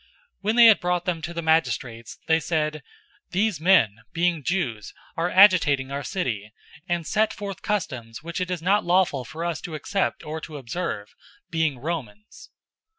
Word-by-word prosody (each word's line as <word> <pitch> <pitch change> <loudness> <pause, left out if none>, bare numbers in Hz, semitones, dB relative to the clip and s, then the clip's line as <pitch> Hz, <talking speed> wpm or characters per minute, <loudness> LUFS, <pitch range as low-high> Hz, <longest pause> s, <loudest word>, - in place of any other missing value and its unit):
016:020 - - -30 0.3
When 215 +3 0
they 240 -1 +8
had 215 -6 +8
brought 180 0 -1
them 170 -3 -1
to 170 - -5
the 170 0 -4
magistrates, 130 -8 0
they 160 0 +3
said, 155 -2 -1 0.5
"These 190 -3 0
men, 160 - +4
being 170 -1 +1
Jews, 125 - -2 0.2
are 170 +2 0
agitating 180 -9 +5
our 140 +1 -3
city, 115 - -3 0.4
016:021 175 - +3
and 170 -2 -6
set 215 +5 +1
forth 200 -3 -6
customs 130 - -3
which 170 +3 -4
it 180 - -2
is 175 -3 -3
not 200 +4 +3
lawful 175 -7 +2
for 155 +7 -6
us 170 -3 -2
to 165 - -6
accept 195 +5 -2
or 155 +1 -5
to 155 -1 -8
observe, 130 - -4 0.4
being 160 -4 0
Romans." 120 -8 -6
165 Hz, 175 wpm, -24 LUFS, 140-180 Hz, 0.5 s, they